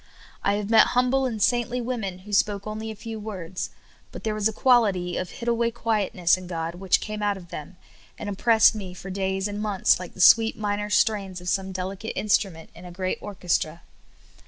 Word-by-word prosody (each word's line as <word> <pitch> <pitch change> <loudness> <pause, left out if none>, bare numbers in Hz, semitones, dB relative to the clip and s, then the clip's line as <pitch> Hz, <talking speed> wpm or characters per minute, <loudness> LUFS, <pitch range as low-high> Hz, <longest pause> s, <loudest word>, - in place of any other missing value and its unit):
I 200 - +2
have 205 +1 -2
met 225 - +7
humble 260 +1 +3
and 225 -3 -4
saintly 240 +2 +1
women, 225 -7 -3
who 210 - -8
spoke 200 0 +1
only 215 +1 -5
a 220 - -6
few^ 220 0 -7
words; 185 -4 -5 0.4
but - - -9
there 220 - -1
was 215 0 +1
a - - -1
quality 205 -8 +2
of 185 - -3
hid 235 - -8
away 235 0 +2
quietness 210 -7 +1
in 185 -1 -9
God 165 -1 -3
which 185 +1 +2
came 215 0 -5
out 205 -1 0
of 175 -3 -13
them, 170 +1 -8 0.4
and - - -6
im 205 - -3
pressed 225 +2 +5
me 190 -4 -7
for 190 +1 -8
days 190 +1 -1
and 205 0 -5
months 205 -4 +2
like 180 -2 -9
the - - -13
sweet 225 +4 +6
minor 205 -1 -2
strains 200 -3 +1
of 180 0 -5
some 190 0 -1
delicate 190 +3 -5
instrument 195 -5 0
in - - -13
a 180 - -9
great 185 +1 -3
or 205 -1 -7
chestra. 170 -2 -1
205 Hz, 210 wpm, -25 LUFS, 185-220 Hz, 0.4 s, met